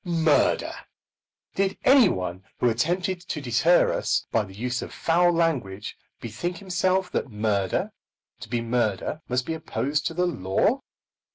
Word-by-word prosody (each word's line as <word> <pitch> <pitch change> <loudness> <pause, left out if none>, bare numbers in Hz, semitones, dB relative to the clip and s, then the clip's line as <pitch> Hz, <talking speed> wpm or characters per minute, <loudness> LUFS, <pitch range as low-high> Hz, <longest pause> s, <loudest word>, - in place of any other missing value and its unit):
Murder! 165 -4 +2 0.8
Did 195 0 0
any 260 -6 +6
one 90 - -4
who 125 - +2
attempted 175 +10 0
to 175 -3 -5
deter 140 +7 +3
us - - 0
by 115 - +2
the 95 -1 -13
use 125 +3 -2
of - - -7
foul 175 +1 +2
language, 130 - -1 0.2
bethink 165 +11 -4
himself 185 0 0
that - - -2
murder, 105 -3 -1 0.5
to 110 - -10
be 120 0 -1
murder, 115 - -1
must 125 0 0
be 160 - -2
opposed 145 -2 -2
to 165 - -5
the 180 +1 +2
law? 165 - +1
150 Hz, 150 wpm, -25 LUFS, 115-175 Hz, 0.8 s, any